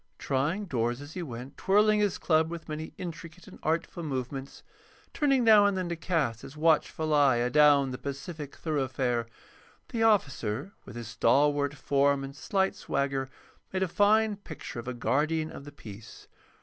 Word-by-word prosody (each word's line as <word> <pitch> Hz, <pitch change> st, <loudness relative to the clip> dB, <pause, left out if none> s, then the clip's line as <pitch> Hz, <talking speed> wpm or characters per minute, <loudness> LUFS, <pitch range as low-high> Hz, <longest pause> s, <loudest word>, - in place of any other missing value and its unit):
Trying 150 Hz, +10 st, -1 dB
doors 120 Hz, -6 st, -1 dB
as 145 Hz, +2 st, -10 dB
he 180 Hz, -, -4 dB
went, 130 Hz, -2 st, -8 dB
twirling 210 Hz, +2 st, +3 dB
his 205 Hz, -2 st, +1 dB
club 160 Hz, -1 st, +2 dB
with 170 Hz, -1 st, -7 dB
many 155 Hz, 0 st, -5 dB
intricate 170 Hz, 0 st, -8 dB
and -, -, -13 dB
artful 165 Hz, +2 st, -1 dB
movements, 135 Hz, -2 st, -5 dB, 0.5 s
turning 275 Hz, -4 st, +2 dB
now 215 Hz, -3 st, +7 dB
and 200 Hz, -2 st, 0 dB
then 185 Hz, -2 st, -2 dB
to 170 Hz, -, -2 dB
cast 155 Hz, -, -1 dB
his 140 Hz, -, -11 dB
watchful 155 Hz, 0 st, +2 dB
eye 140 Hz, -4 st, +5 dB
adown 140 Hz, +2 st, +4 dB
the 125 Hz, -, -6 dB
pacific 140 Hz, +1 st, -6 dB
thoroughfare, 130 Hz, -6 st, -1 dB, 0.6 s
the 230 Hz, -, -3 dB
officer, 145 Hz, -, +1 dB
with -, -, -11 dB
his 120 Hz, -2 st, -6 dB
stalwart 145 Hz, +4 st, +2 dB
form 140 Hz, 0 st, +1 dB
and 135 Hz, 0 st, -7 dB
slight 190 Hz, +5 st, 0 dB
swagger, 135 Hz, -1 st, -2 dB, 0.4 s
made 190 Hz, 0 st, 0 dB
a -, -, 0 dB
fine 210 Hz, +3 st, +3 dB
picture 160 Hz, -, -8 dB
of 120 Hz, -, -8 dB
a 125 Hz, -, -3 dB
guardian 155 Hz, +6 st, 0 dB
of 140 Hz, -, -10 dB
the 145 Hz, -, -9 dB
peace. 110 Hz, -5 st, -12 dB
150 Hz, 165 wpm, -29 LUFS, 135-175 Hz, 0.6 s, now